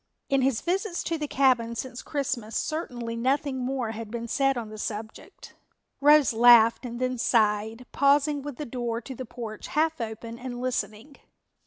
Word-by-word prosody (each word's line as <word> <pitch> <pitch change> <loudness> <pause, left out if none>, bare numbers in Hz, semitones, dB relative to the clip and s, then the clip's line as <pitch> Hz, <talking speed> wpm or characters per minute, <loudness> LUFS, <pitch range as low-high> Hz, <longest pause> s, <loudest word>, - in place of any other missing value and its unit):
In 275 -1 +3
his 260 -3 +1
visits 365 +1 -1
to 330 -2 -2
the 300 - -2
cabin 250 -4 +2
since 255 +1 -5
Christmas 255 -6 -3
certainly 245 -7 -3
nothing 265 +3 0
more 250 -2 -2
had 225 -1 -7
been 235 +1 -5
said 270 +2 +1
on 225 -3 -5
the 215 0 -9
subject. 215 +1 -7 0.5
Rose 295 -2 +6
laughed 235 +1 +6
and 240 0 -6
then 255 -1 -1
sighed, 220 +1 +1
pausing 285 +1 +3
with 290 -1 -6
the 300 - -5
door 240 -2 -3
to 260 +3 -8
the 255 0 -7
porch 225 -2 -7
half 315 -2 0
open 230 +1 -6
and 245 -1 -6
listening. 245 +1 -4
245 Hz, 170 wpm, -26 LUFS, 230-275 Hz, 0.5 s, Rose